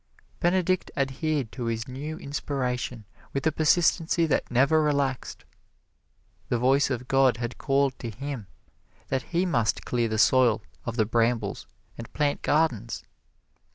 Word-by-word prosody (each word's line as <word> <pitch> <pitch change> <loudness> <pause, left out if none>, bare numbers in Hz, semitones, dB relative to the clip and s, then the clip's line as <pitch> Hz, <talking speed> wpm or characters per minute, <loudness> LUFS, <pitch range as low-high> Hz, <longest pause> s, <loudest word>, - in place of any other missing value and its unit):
Benedict 185 +1 +1
adhered 135 -2 -1
to 125 - -5
his 115 -1 -2
new 145 +5 -6
inspiration 125 -6 -3 0.3
with 135 - -2
a 160 - +4
persistency 165 +2 +3
that 155 - 0
never 140 +6 +4
relaxed 140 -4 -1 1.0
the 120 - +1
voice 135 +4 +3
of 125 -2 -3
God 135 -2 +4
had 120 0 -5
called 135 -1 +1
to 120 - -5
him 125 -1 -6 0.6
that 135 -1 0
he 175 +1 +1
must 120 - 0
clear 120 -2 0
the 110 0 -2
soil 120 -1 +4 0.2
of 115 - -3
the 110 -3 +2
brambles 115 -1 0 0.3
and 115 - -8
plant 145 -1 0
gardens. 125 -8 0
135 Hz, 140 wpm, -26 LUFS, 120-150 Hz, 1.0 s, a